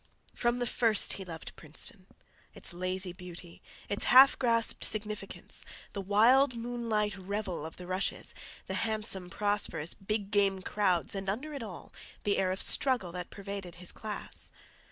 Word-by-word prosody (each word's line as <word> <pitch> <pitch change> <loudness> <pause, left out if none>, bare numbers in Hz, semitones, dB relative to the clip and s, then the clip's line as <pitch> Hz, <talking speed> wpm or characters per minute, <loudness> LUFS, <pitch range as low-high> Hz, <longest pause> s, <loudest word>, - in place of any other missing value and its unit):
From 240 0 +1
the 245 - 0
first 230 -3 +3
he 195 - -5
loved 165 -2 -8
Princeton—its 175 +4 -5
lazy 185 +1 -1
beauty, 180 -1 -10 0.3
its 205 - 0
half 265 +2 +9
grasped 230 -3 +2
significance, 210 -2 -2 0.3
the 200 - -3
wild 235 +7 +5
moonlight 230 -3 -1
revel 195 -3 -3
of 160 - -12
the 180 - -8
rushes, 185 +2 0 0.3
the - - -4
handsome, 215 -5 0
prosperous 205 -5 0
big 205 0 -3
game 195 -2 +2
crowds, 185 -5 +1
and 195 -1 -3
under 270 +10 -3
it 280 - -5
all 200 -7 -8 0.3
the 200 -1 +2
air 190 -1 +2
of 185 +1 +2
struggle 250 -10 +3
that 180 0 -6
pervaded 200 -3 -7
his 180 0 -3
class. 215 -1 -3
200 Hz, 150 wpm, -31 LUFS, 185-220 Hz, 0.3 s, half